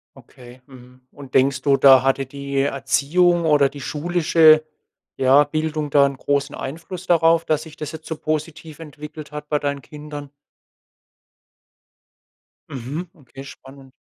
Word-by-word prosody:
Okay, 125 -1 -16
mhm. 125 -1 -16
Und 135 -2 -13
denkst 135 0 +2
du, 140 0 +2
da 135 -2 +6
hatte 135 0 0
die 140 +1 -5
Erziehung 145 +6 +1
oder 145 -3 +3
die 140 - -11
schulische, 155 +1 +3 0.5
ja, 135 +2 +4
Bildung 155 0 -3
da 140 0 +4
'n 140 -1 -3
großen 140 +1 -1
Einfluss 165 +6 -8
darauf, 165 -1 +3
dass 155 -1 0
sich 160 -2 -14
das 150 +1 -6
jetzt 160 0 -10
so 160 - -5
positiv 155 0 -5
entwickelt 150 -1 -10
hat 150 0 -8
bei 150 - 0
deinen 140 -1 -3
Kindern? 145 -1 -10 2.4
Mhm, 140 +7 -6
okay, 135 -3 -13
spannend. 135 0 -14
145 Hz, 140 wpm, -21 LUFS, 135-155 Hz, 2.4 s, da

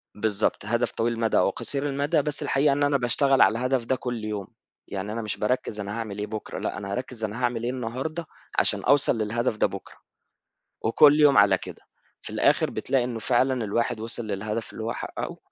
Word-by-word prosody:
بالضبط، 105 -1 0
هدف 120 +3 0
طويل 115 +1 0
المدى 115 -1 +1
أو 90 - +4
قصير 140 +8 -3
المدى، 145 +3 +1
بس 145 0 0
الحقيقة 140 +1 +2
إن 145 +1 0
أنا 145 -1 +3
باشتغل 135 +2 +2
على 115 +1 +5
الهدف 125 -1 0
ده 130 - +1
كُلَّ 120 -4 -4
يوم. 105 -3 -4 0.4
يعني، 100 +2 -4
أنا 115 - -3
مش 105 - -2
بارَكِّز 105 -1 -1
أنا 105 +2 -4
هاعمل 110 -3 -5
إيه 105 - -3
بكرة؟ 110 0 -6
لأ، - - -3
أنا 100 0 -6
هارَكِّز 125 -2 -5
أنا 110 +3 -3
هاعمل 120 -1 0
إيه 120 - 0
النهارده، 130 +7 -4 0.3
عشان - - +2
أوصَل 140 -4 +4
للهدف 110 +1 -1
ده - - +3
بكرة. 95 0 -9 0.9
وكُلَّ 145 +6 +5
يوم 145 -3 +6
على 100 -2 +6
كده، - - -10 0.4
في - - -9
الآخر، - - +2
بتلاقي 130 -1 0
إنه 120 -2 -4
فعلًا 130 +1 +1
الواحد 110 +1 -1
وِصل 115 0 -5
للهدف 105 +2 -4
اللي 110 - -6
هو 115 - -2
حقَّقه. - - -5
115 Hz, 200 wpm, -25 LUFS, 105-130 Hz, 0.9 s, يوم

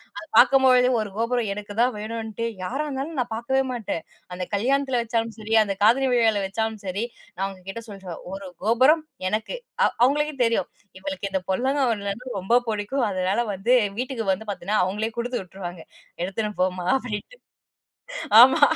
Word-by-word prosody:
அது 330 0 -7
பாக்கும் 265 +3 +7
பொழுதே 255 -1 +6
ஒரு 215 -2 -2
கோபுரம் 230 -1 0
எனக்குத்தான் 210 +5 0
வேணுன்னுட்டு 220 +1 -4 0.2
யாரா 270 +10 -2
இருந்தாலும் 285 +3 -4
நான் 245 - -1
பாக்கவே 235 +4 0
மாட்டேன். 220 -9 -3 0.3
அந்தத் 180 +2 -5
கல்யாணத்துல 265 +4 +1
வெச்சாலும் 230 -1 -1
சரி, 220 +1 -4
அந்த 200 -2 0
காதணி 260 +5 +5
விழாவுல 225 -4 +3
வச்சாலும் 220 +2 -2
சரி, 195 +3 -2 0.3
நான் 195 - -1
அவுங்ககிட்ட 195 +3 -7
சொல்லிருவேன். 190 -4 -8
"1 195 0 -6 0.2
கோபுரம் 260 +8 +4 0.2
எனக்கு."அவு 465 - -1
அவுங்களுக்கே 295 +3 +2
தெரியும், 230 -1 +1 0.3
இவளுக்கு 280 -3 -4
இந்தப் 190 -2 -2
பொல்லாங்கா 265 +6 +1
உருண்டன்னா 210 +4 -4
ரொம்பப் 235 +6 +2
புடிக்கும். 220 +4 -1
அதனால 190 +5 0
வந்து 195 +6 +1 0.3
வீட்டுக்கு 250 -3 -3
வந்து 210 +3 -3
பாத்தீங்கன்னா, 195 +3 0
அவுங்களே 210 +4 -2
குடுத்து 245 +1 -2
விட்ருவாங்க. 175 -2 -8 0.4
"எடுத்துன்னுப் 210 +2 -3
போமா" 185 -1 0
அப்டின்னுட்டு. 250 - -6 1.0
ஆமா, 265 +6 +7
225 Hz, 150 wpm, -24 LUFS, 200-255 Hz, 1.0 s, பாக்கும்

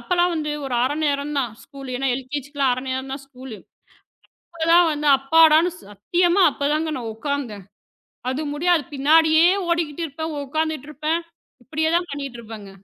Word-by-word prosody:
அப்பெல்லாம் 355 -1 +1
வந்து 300 -1 -2 0.2
ஒரு 250 - -3
1/2 280 +4 0
நேரம்தான் 280 -4 -1
ஸ்கூல்லு 275 -3 -9
ஏன்னா 270 0 0
எல்கெஜிக்குலாம் 275 0 -2
1/2 255 +1 -3
நேரம்தான் 265 +1 -4
ஸ்கூல்லு 255 -4 -10 1.0
அப்பெல்லாம் 335 +1 +4
வந்து 295 0 -3
அப்பாடான்னு, 320 +4 +5 0.2
சத்தியமா 345 - +1
அப்பதாங்க 305 +3 -1
நான் 225 -2 -5
உட்காந்தேன். 230 -5 -4 0.7
அது 265 +4 -2
முடியாது, 335 +1 +2
பின்னாடியே 315 +4 +5 0.2
ஓடிக்கிட்டுருப்பேன், 320 -1 -2
உட்கார்ந்துட்டுருப்பேன். 310 +1 -2 0.4
இப்படியேதான் 320 +5 0
பண்ணிட்டு 275 -4 -6
இருப்பங்க. 220 -3 -10
290 Hz, 120 wpm, -22 LUFS, 265-320 Hz, 1.0 s, அப்பாடான்னு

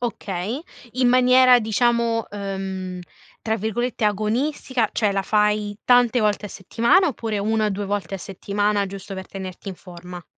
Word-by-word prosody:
Okay. 215 0 -3 0.3
In 255 0 +2
maniera 255 0 +6
diciamo, 230 +1 +1
uhm, 190 -2 -5 0.4
tra 220 0 -1
virgolette 220 +2 -2
"agonistica", 225 +3 0
cioè, 210 -3 +1
la 195 - 0
fai 210 0 +1
tante 245 -1 +4
volte 210 -1 0
a - - -9
settimana, 235 - +2
oppure 225 -6 -3
1-2 210 -1 0
volte 200 0 -3
a 195 - -4
settimana 200 +2 -1
giusto 195 0 -8
per 190 -1 -7
tenerti 190 0 -8
in 190 - -5
forma? 180 -1 -11
210 Hz, 145 wpm, -22 LUFS, 195-235 Hz, 0.4 s, maniera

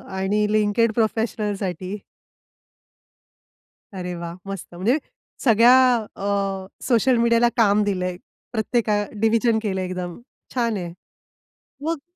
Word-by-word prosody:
आणि 190 +2 0
LinkedIn 215 +2 +2
प्रोफेशनलसाठी. 210 -4 -2 2.0
अरे 180 0 -4
वाह! 170 0 -6
मस्त. 195 -3 -7
म्हणजे 215 - +2 0.5
सगळ्या 235 0 +6 0.4
अ, 195 - -6 0.6
सोशल 245 0 +3
मीडियाला 235 0 +4
काम 210 -2 +4
दिलंय. 185 -3 -2 0.3
प्रत्येका 220 -2 0 0.2
डिव्हिजन 225 +1 +3
केलं 195 -3 -2
आहे 185 - -3
एकदम, 180 -1 -5 0.4
छान 230 -4 +1
आहे. 170 -2 -5 0.9
मग 325 -3 -1
210 Hz, 105 wpm, -23 LUFS, 190-230 Hz, 2.0 s, सगळ्या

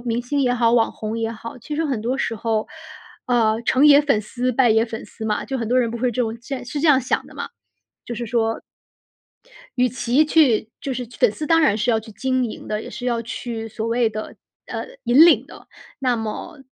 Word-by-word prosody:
明 240 0 -1
星 280 +4 -2
也 250 -2 +2
好、 235 -1 +2
网 230 -2 +3
红 220 +1 -5
也 225 0 -1
好， 230 +2 -8
其 295 +6 -6
实 325 - 0
很 265 -7 -1
多 250 +5 -2
时 225 - -1
候， 220 0 -1 0.6
呃， 230 -2 +2
成 265 +5 +4
也 285 -1 +8
粉 280 -8 +1
丝， 250 +4 -2
败 245 -1 +3
也 220 +1 +4
粉 225 -1 -7
丝 220 +1 -9
嘛。 210 -1 -1
就 270 - -3
很 230 -3 -3
多 250 - +3
人 240 -2 +2
不 235 - -5
会 250 +1 +1
这 250 - -2
种 225 -1 -1
现 270 0 -4
在 250 - -10
是 280 +4 -4
这 325 - +3
样 270 -3 +6
想 255 - -1
的 - - -15
嘛， - - -5 0.6
就 240 - -5
是 235 +1 -4
说 225 0 0 1.2
与 250 0 +4
其 255 +4 +2
去 265 -9 +3
就 270 -2 -3
是 245 -1 -4
去 245 - -16
粉 245 -5 +4
丝 305 +7 -5
当 330 +1 +4
然 270 -10 +3
是 220 +3 +1
要 225 - +2
去 220 0 -10
经 260 +2 0
营 220 - -7
的， 210 0 -2
也 - - -9
是 245 - -7
要 235 -1 0
去 225 -1 -5
所 220 +1 -5
谓 235 0 +2
的 215 0 -7 0.3
呃， - - -5 0.2
引 265 +8 +7
领 345 - +4
的。 - - -14 0.3
那 255 -2 +1
么 225 +5 -6
240 Hz, 260 characters per minute, -21 LUFS, 225-260 Hz, 1.2 s, 也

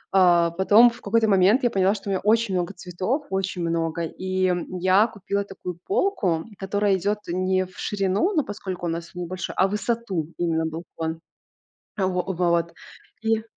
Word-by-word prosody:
А, 175 -2 +5
потом, 205 +7 +6
в 235 - -14
какой-то 220 +2 +2
момент, 200 +6 +4
я 240 - +3
поняла, 195 +1 +2
что 205 - -9
у - - 0
меня 190 - 0
очень 220 -1 +2
много 180 +2 -1
цветов, 185 - -3
очень 190 -2 -2
много, 165 0 -1
и, 185 +3 -2
м, 180 0 -2
я 185 +4 +4
купила 200 -1 -3
такую 180 -3 -8
полку, 250 - 0
которая 200 +1 +1
идёт 205 +4 0
не 185 +1 0
в 185 - -17
ширину, 200 - 0
но 300 - +3
поскольку 190 -4 -6
у - - 0
нас 170 +1 -5
он 180 - -4
небольшой, 185 +2 -5
а 190 - +4
в 195 - -7
высоту 210 -6 -2
именно 165 -2 0
балкон. 160 0 -5 0.8
Во 190 -2 +1 0.3
вот 170 -1 +1 0.5
и 225 0 +1
185 Hz, 175 wpm, -24 LUFS, 175-205 Hz, 0.8 s, потом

